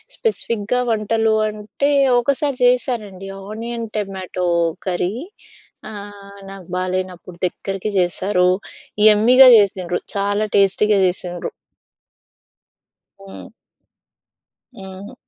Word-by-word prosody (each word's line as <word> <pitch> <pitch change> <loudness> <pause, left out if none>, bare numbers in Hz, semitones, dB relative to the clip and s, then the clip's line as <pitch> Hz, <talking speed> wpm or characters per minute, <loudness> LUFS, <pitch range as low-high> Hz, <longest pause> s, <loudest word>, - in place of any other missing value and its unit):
స్పెసిఫిక్‌గా 235 - -1
వంటలు 220 0 +1
అంటే 215 +6 -3 0.3
ఒకసారి 280 +2 -1
చేశారండి. 225 -6 0 0.2
Onion 230 +1 -5
tomato 190 -3 -4 0.4
curry. 180 +1 -1 0.8
ఆహ్, 200 -1 -11
నాకు 195 -3 -11
బాలేనప్పుడు 185 -1 -4
దగ్గరకి 195 +3 -5
చేశారు. 180 +1 +1 0.6
యమ్మీగా 245 +5 +7
జేసిండ్రు! 185 -4 0 0.2
చాలా 205 +2 0
టేస్టీగా 200 +1 +3
జేసిండ్రు! 180 -1 -3 1.7
హ్మ్. 95 -1 -11 1.3
హ్మ్. 190 +4 -10
200 Hz, 80 wpm, -19 LUFS, 185-220 Hz, 1.7 s, యమ్మీగా